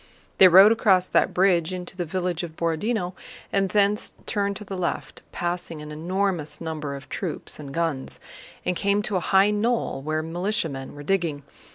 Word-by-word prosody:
They 190 - +10
rode 190 +4 +8
across 195 -5 +4
that - - +2
bridge 180 -2 +2
into 180 0 -6
the 180 -2 -3
village 180 0 -2
of 165 -3 -7
Borodinó 175 +4 -1 0.4
and 195 -1 +2
thence 205 +1 +1
turned 200 -1 -1
to 210 - -6
the 195 -1 -6
left, 170 -5 -3
passing 175 -2 -3
an 150 0 -8
enormous 175 0 -2
number 155 -4 -4
of 140 - -10
troops 170 -5 -5
and 140 -2 -8
guns, 160 -3 -2 0.5
and 180 - 0
came 200 +3 +1
to 205 - -2
a - - +3
high 195 +1 +5
knoll 225 - 0
where 155 +2 -2
militiamen 165 -5 -2
were 145 - -9
digging. 165 -4 -1
180 Hz, 175 wpm, -25 LUFS, 160-195 Hz, 0.5 s, They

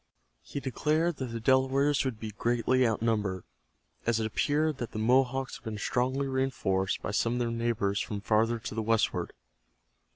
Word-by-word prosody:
He - - -6
declared 155 +5 0
that 130 - -3
the 115 -1 -5
Delawares 135 +4 +3
would 125 -5 -3
be 110 -1 -5
greatly 120 +3 +2
outnumbered, 105 -4 0 0.6
as 115 -1 +2
it 110 - 0
appeared 150 +7 +1
that 120 - -5
the - - -4
Mohawks 130 +3 +2
had - - -22
been 110 -2 -5
strongly 130 +6 0
reinforced 130 -8 0
by - - -2
some 115 +3 +1
of 125 - -1
their 120 -1 0
neighbors 115 -4 0
from 105 - -4
farther 110 +3 +2
to 115 - -6
the 110 - -1
westward. 115 0 +1
120 Hz, 170 wpm, -29 LUFS, 110-130 Hz, 0.6 s, Delawares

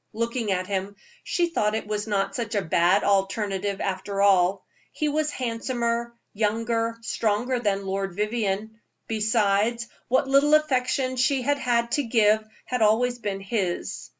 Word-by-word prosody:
Looking 230 -1 -2
at 185 -1 0
him, 195 +1 -3 0.3
she 345 -1 0
thought 210 -9 +1
it 220 - -3
was 210 0 -3
not 200 -2 0
such 230 -5 -3
a 200 - +1
bad 175 +4 +3
alternative, 195 0 0
after 195 +1 -3
all. 195 -1 +3 0.3
He 305 - -2
was 305 +1 0
handsomer, 235 -1 -2 0.2
younger, 230 +2 0
stronger 230 +3 0
than 200 -4 -1
Lord 195 -1 -3
Vivianne; 215 0 -2 0.3
besides, 220 +1 +1 0.2
what 260 +2 +2
little 280 +2 +5
affection 260 -3 +1
she 265 +1 +2
had 285 +2 +1
had 235 -2 0
to 290 - +1
give 220 -2 +3 0.2
had 250 -2 -2
always 245 +3 +3
been 200 -3 -3
his. 195 -3 -3
220 Hz, 150 wpm, -25 LUFS, 200-245 Hz, 0.3 s, little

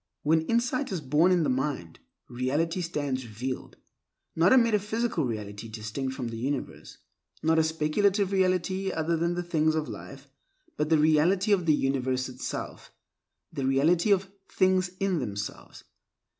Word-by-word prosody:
When 160 +1 +2
insight 245 +3 0
is 185 - -1
born 150 +5 +3
in 175 -2 +3
the 145 - +1
mind, 130 - -3 0.3
Reality 145 +8 -1
stands 145 -6 -2
revealed; 120 +3 -6 0.6
not 170 +4 +4
a 260 - +7
metaphysical 220 - +1
reality 105 -1 -5
distinct 110 +5 -4
from 125 -4 -4
the 115 -1 -6
universe; 140 +4 -4 0.5
not 160 +1 +3
a - - +4
speculative 185 +6 +1
reality 190 0 +1
other 165 +1 0
than 170 +2 0
the 175 - -2
things 155 -2 +1
of 155 -1 -1
life, 140 0 -9 0.5
but 150 - -1
the 160 - +5
Reality 160 +7 +3
of 180 -4 +2
the 155 - +5
universe 130 -2 -1
itself, 125 0 -6 0.6
the 135 -4 -2
Reality 160 +8 +3
of 195 -1 +2 0.2
"things 185 -1 +2
in 195 -4 +1
themselves." 100 -3 -6
160 Hz, 150 wpm, -27 LUFS, 130-185 Hz, 0.6 s, a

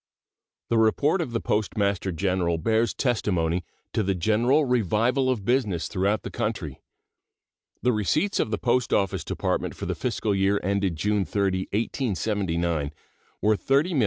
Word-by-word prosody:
The 115 - +3
report 145 - +3
of 160 - -3
the 115 - -1
Postmaster 100 -3 0
General 90 -1 0
bears 110 +5 +1
testimony 90 - 0 0.3
to - - +1
the 95 -2 0
general 115 - +2
revival 125 +2 +2
of 115 -7 -1
business 110 -9 +1
throughout 100 +2 0
the - - -6
country. - - -3 1.0
The 125 0 +3
receipts 155 - +1
of - - +1
the 105 - -1
Post 125 0 +1
Office 95 -3 +1
Department - - -2
for - - -6
the - - -1
fiscal 105 - -1
year 100 +1 +2
ended 100 -2 0
June 105 +5 +1
30, 95 -2 -1
1879, 95 - -1 0.5
were 110 0 +4
$30,041,982. 140 - +1
105 Hz, 145 wpm, -25 LUFS, 95-120 Hz, 1.0 s, were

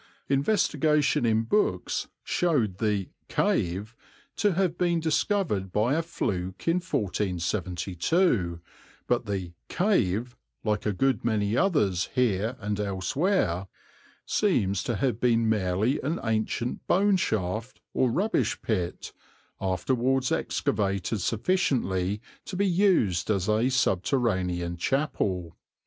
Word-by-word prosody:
Investigation 150 - +2
in 110 0 +2
books 210 - 0 0.2
showed 120 - 0
the 105 -4 0 0.2
"cave" 100 +7 0 0.4
to 205 -3 +2
have 175 -1 +1
been 175 -1 +1
discovered 160 - 0
by 110 +7 +2
a 160 - +2
fluke 95 - -3
in 165 +2 +3
1472, 90 - 0 0.5
but 120 -2 0
the 95 -4 -3 0.2
"cave," 125 - +1 0.3
like 105 -1 0
a - - +2
good 130 +3 +1
many 110 -2 +1
others 115 - +2
here 115 -2 +1
and 105 0 -3
elsewhere, 100 - 0 0.6
seems 100 - +1
to 120 - -2
have 115 +1 0
been 115 -2 +3
merely 105 +4 +1
an 155 +5 -2
ancient 110 +2 -1
boneshaft 125 - +1
or 130 - +2
rubbish 205 - 0
pit, 90 -6 -2 0.5
afterwards 125 +7 0
excavated 100 +1 -1
sufficiently 105 - 0 0.3
to - - -6
be 200 - +2
used 175 - +2
as 95 -4 +1
a 110 +4 +2
subterranean 95 -7 0
chapel. 95 - -1
110 Hz, 110 wpm, -27 LUFS, 95-145 Hz, 0.6 s, in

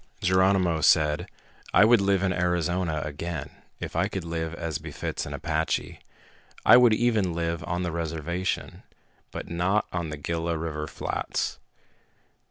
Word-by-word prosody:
Geronimo 95 -3 +3
said, 75 0 +3 0.5
"I 105 - +8
would 115 -1 +5
live 100 -1 +2
in 95 -1 +2
Arizona 90 -2 0
again, 80 +3 -5 0.3
if - - -6
I - - +2
could 95 - -4
live 80 -1 -3
as 80 -3 -3
befits 75 -2 -4
an - - -6
Apache. 80 0 -2 0.7
I - - +9
would 120 -3 +6
even 110 -7 +1
live 85 0 -2
on 90 +1 -2
the 85 - -2
reservation, 85 +3 -3 0.5
but - - -7
not 90 +5 +1
on 85 -2 -2
the 75 - -5
Gila 85 +2 -2
River 80 -1 -4
flats." - - -3
85 Hz, 145 wpm, -26 LUFS, 80-95 Hz, 0.7 s, I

